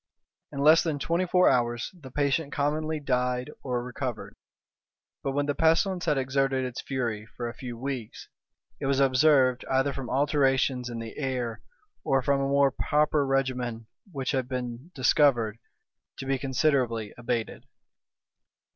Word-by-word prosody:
In 140 - -4
less 155 +3 +7
than 160 -4 -1
twenty 170 +5 0
four 180 +1 +4
hours 120 -1 +1
the 155 -8 -12
patient 140 +2 0
commonly 155 +3 -1
died 125 0 -1
or 125 -2 -2
recovered, 125 -1 -5 0.9
but 135 - -2
when 145 +1 0
the 145 - 0
pestilence 170 +4 +2
had 150 -4 +2
exerted 135 0 0
its 125 -1 -5
fury 115 -5 -3
for 120 - -3
a 115 - -5
few 120 -1 -7
weeks, 130 -3 -5 0.5
it 135 - -2
was 135 0 +2
observed, 130 -1 +4
either 135 +1 +2
from 135 -3 -6
alterations 135 -2 +1
in 120 - -5
the 115 -1 -7
air, 125 -5 -2 0.4
or 135 -1 +1
from 140 +1 +2
a 135 - 0
more 140 0 +4
proper 150 +2 +1
regimen 125 -4 -1 0.3
which 135 -5 -2
had 130 -3 -1
been 125 +3 -5
discovered, 120 -5 +3 0.6
to - - -6
be 135 0 0
considerably 130 -5 0
abated. 120 -1 -3
135 Hz, 150 wpm, -27 LUFS, 125-145 Hz, 0.9 s, less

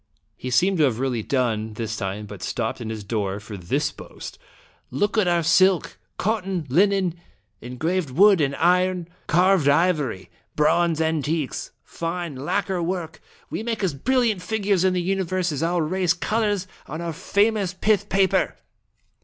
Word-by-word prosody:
He 130 - -6
seemed 180 +9 +2
to - - +5
have 125 -5 0
really 125 -3 -1
done 110 -3 -1
this 110 0 -4
time, 100 0 -4
but - - -10
stopped - - -3
in 110 - -5
his 110 -2 -5
door 100 -2 -2
for 105 0 -9
this 90 -3 -1
boast: - - -10 0.5
"Look 205 - 0
at 215 -4 +3
our 175 -1 +2
silk, 185 +2 +3 0.2
cot 215 0 0
ton, 185 -4 -3
linen, 185 +2 +2 0.4
engraved 160 +7 -2
wood 190 +6 +5
and 140 -1 +1
iron, 180 +1 +2 0.2
carved 180 -3 +4
ivory, 145 - +1 0.2
bronze 165 +2 +2
antiques, 160 -2 -1
fine 170 -2 -4
lacquer 175 +7 -1
work! 170 -2 -3 0.3
We - - -3
make 225 -2 -3
as 180 -5 +1
brilliant 230 - +1
figures 200 -1 0
in 190 -1 +3
the 180 -1 0
universe 185 -1 -1
as 145 - -3
our 170 0 +1
rare 185 +4 -1
colors 210 -3 0 0.2
on 155 +3 -6
our 170 -1 -3
famous 200 +1 +1
pith 205 +1 +1
paper 195 -1 +2
170 Hz, 160 wpm, -23 LUFS, 135-190 Hz, 0.5 s, to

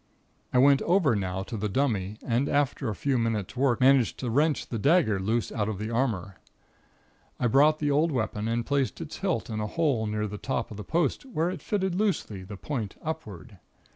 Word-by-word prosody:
I - - +1
went 140 +2 +6
over 170 - +3
now 95 -1 -2
to 115 - -7
the 105 0 -2
dummy, 105 -4 0
and 125 +3 +1
after 140 -3 0
a 105 - -3
few 135 +1 0
minute's 115 -2 -2
work 130 -2 +2
managed 130 -2 +4
to 125 -3 -3
wrench 150 +4 +2
the 115 - -4
dagger 140 - +3
loose 110 +4 -1
out 105 -1 -1
of 105 - -3
the 110 +3 -4
armor. 110 -7 -1 1.0
I - - 0
brought 145 +6 +5
the 145 -1 0
old 155 +4 +2
weapon 110 -4 -2
and 115 +1 -1
placed 140 -2 0
its 160 -2 -7
hilt 185 -6 -1
in 110 -3 -4
a 105 - -2
hole 135 -5 0
near 105 0 -1
the 105 0 -6
top 130 - -3
of 105 - -7
the 105 - -6
post 165 +1 0
where 175 -8 -1
it 185 - -7
fitted 190 -3 -1
loosely, 185 - -1
the 100 +2 -9
point 115 -4 -4
upward. 110 - -6
125 Hz, 205 wpm, -27 LUFS, 105-145 Hz, 1.0 s, went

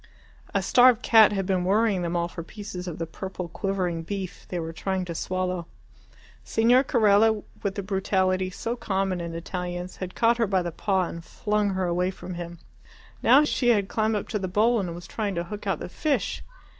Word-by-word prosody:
A - - 0
starved 245 -2 +5
cat 220 -2 +7
had 195 -2 -1
been 185 -2 +1
worrying 200 0 +2
them 170 0 -2
all 170 0 +1
for 170 - -7
pieces 185 0 -7
of 170 - -5
the 165 - -3
purple 180 +2 -6
quivering 180 -2 -2
beef 190 +1 -6
they 180 - -2
were 165 0 -5
trying 190 +2 -2
to 170 - -5
swallow. 185 0 -2 0.8
Signor 240 +4 +4
Carella, 220 -3 +3 0.2
with 195 -1 -2
the 200 - -3
brutality 190 -1 0
so 230 +5 -4
common 190 -5 -1
in 170 -1 -5
Italians, 180 +1 -5
had 185 -1 -6
caught 235 +1 +3
her 230 -2 +2
by 190 -2 +1
the 175 - -3
paw 190 +2 0
and 170 -1 -6
flung 210 +3 -1
her 185 0 0
away 180 +1 +1
from 185 -1 -7
him. 175 0 -7 0.6
Now 265 +5 +6
she 275 -4 0
had 205 -4 +3
climbed 220 0 +1
up 205 - -3
to 210 - -1
the 190 - -2
bowl 220 +6 +3
and 175 -4 -3
was 175 0 -9
trying 205 -2 -3
to 170 - -1
hook 205 +3 -7
out 195 - +1
the - - -6
fish. 290 - -1
190 Hz, 205 wpm, -26 LUFS, 180-210 Hz, 0.8 s, cat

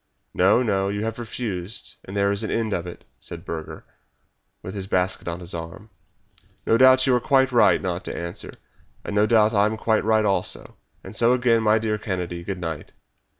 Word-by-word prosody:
"No, 100 +7 +4
no; 100 -4 0
you 105 +1 -3
have 115 +1 -4
refused, 110 -5 -5
and 95 +2 -6
there 100 0 +2
is 100 +1 0
an 110 - -3
end 110 -2 -1
of 85 0 -3
it," 90 - -10
said 85 +1 -8
Burger, 80 -3 -7 0.8
with 95 - -6
his 95 -2 -4
basket 90 -1 -1
on 85 0 -3
his 85 0 -5
arm. 85 +6 -8 0.7
"No - - +3
doubt 130 +1 +6
you 130 - +3
are 125 - +3
quite 135 -1 +3
right 120 -2 +4
not 90 -1 -3
to - - -4
answer, 85 0 -6 0.5
and 105 - -5
no 105 +1 +3
doubt 110 -1 +4
I 100 0 +4
am 110 +1 -3
quite 110 0 +1
right 110 0 +2
also 100 - -1 0.3
and - - -9
so 120 +2 +4
again, 120 -2 +2
my 110 0 +4
dear 110 -1 -1
Kennedy, 90 -4 -4
good 95 +1 -5
night!" 80 -3 -6
105 Hz, 200 wpm, -23 LUFS, 90-115 Hz, 0.8 s, doubt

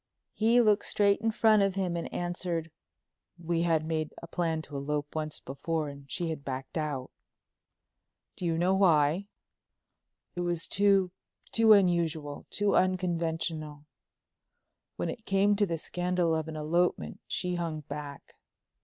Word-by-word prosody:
He 230 +3 +4
looked 210 -3 +3
straight 200 0 +2
in 225 - +1
front 220 -1 +4
of 195 -1 +1
him 185 -3 -1
and 170 - -4
answered: 175 -2 -3 0.7
"We 170 -1 -1
had 165 -2 +2
made 155 -1 -2
a - - -9
plan 165 -2 -1
to 145 - -10
elope 145 +1 -3
once 155 -1 -3
before 150 +3 -3
and 140 -1 -12
she 175 -3 -2
had 155 -3 -6
backed 135 -1 -5
out." 145 -5 -3 1.2
"Do 180 - -3
you 165 -1 0
know 180 +3 +2
why?" 170 -1 +3 1.1
"It 175 - -2
was 175 -1 -1
too—too 200 +3 +2
unusual—too 170 0 +1
unconventional. 165 -4 -1 1.1
When - - -2
it 225 - -11
came 200 +1 +3
to 205 -1 +2
the 165 -1 -2
scandal 175 0 0
of 160 0 -2
an 160 - -6
elopement 170 +4 0
she 180 0 -2
hung 165 -3 -3
back." 145 -1 -8
170 Hz, 140 wpm, -29 LUFS, 155-185 Hz, 1.2 s, He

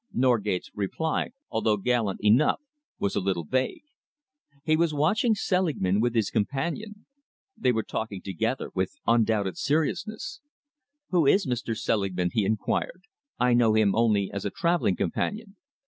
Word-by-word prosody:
Norgate's 110 -7 +1
reply, 105 +11 -2 0.2
although 105 -2 +1
gallant 110 -2 0
enough, 115 +8 +4 0.4
was 100 - -1
a - - +2
little 95 -3 -1
vague. 130 +11 -1 0.8
He 155 0 +3
was 160 -1 +1
watching 215 - +2
Selingman 155 - +1
with 120 0 0
his 110 -3 +1
companion. 170 - -2 0.5
They 125 - +2
were 110 -2 0
talking 105 -3 -4
together 110 +7 -3
with 95 +9 -2
undoubted 110 -5 +2
seriousness. 195 - -1 0.7
"Who 170 -6 +3
is 195 +7 +4
Mr. 120 -3 -2
Selingman?" 95 -6 0
he 110 -3 +2
enquired. 110 - -1 0.3
"I 125 0 +3
know 115 -2 +4
him 105 -3 +4
only 110 -4 +2
as 100 - -3
a - - -1
travelling 170 - +1
companion." 205 - -3
115 Hz, 140 wpm, -27 LUFS, 100-160 Hz, 0.8 s, enough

